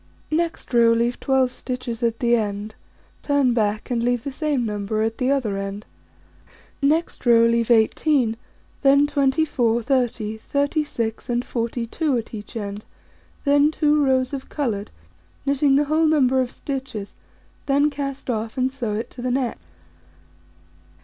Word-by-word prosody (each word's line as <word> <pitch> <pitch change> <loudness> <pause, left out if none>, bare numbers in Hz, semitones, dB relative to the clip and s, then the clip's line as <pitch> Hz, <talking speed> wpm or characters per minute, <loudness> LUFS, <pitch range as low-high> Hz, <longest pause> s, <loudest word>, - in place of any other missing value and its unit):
Next 330 -4 -2
row: 230 -1 +5
Leave 235 +1 0
12 260 -2 +1
stitches 250 -2 -5
at 230 -1 0
the 240 -1 +4
end, 210 -1 -3 0.5
turn 285 -4 +2
back, 215 +1 -1
and 235 -1 +1
leave 245 -1 0
the 280 - -4
same 290 -3 -1
number 210 0 -2
at 225 0 -2
the 255 0 +1
other 245 -8 0
end. 195 +1 -5 1.0
Next 310 +4 +1
row: 230 -2 +6
Leave 230 0 +2
18, 235 +1 +3 0.5
then 280 +1 +5
24, 270 -5 +1
30, 235 -4 0
36, 280 -5 -2
and 240 0 0
42, 240 +5 -1
at 230 - -6
each 210 0 -8
end, 205 -1 -5 0.6
then 285 +1 +5
2 300 -1 +2
rows 260 0 +1
of 270 -1 -5
coloured, 230 -9 -2 0.6
knitting 280 0 +3
the 290 - +4
whole 315 +2 +2
number 265 -4 +3
of 250 - -2
stitches, 255 -8 -6 0.5
then 285 +2 +3
cast 275 -1 -5
off, 225 0 -3
and 260 0 +1
sew 240 -6 -3
it 225 - -4
to 250 - -8
the 250 - -1
neck. 250 -1 -1
250 Hz, 150 wpm, -22 LUFS, 230-280 Hz, 1.0 s, row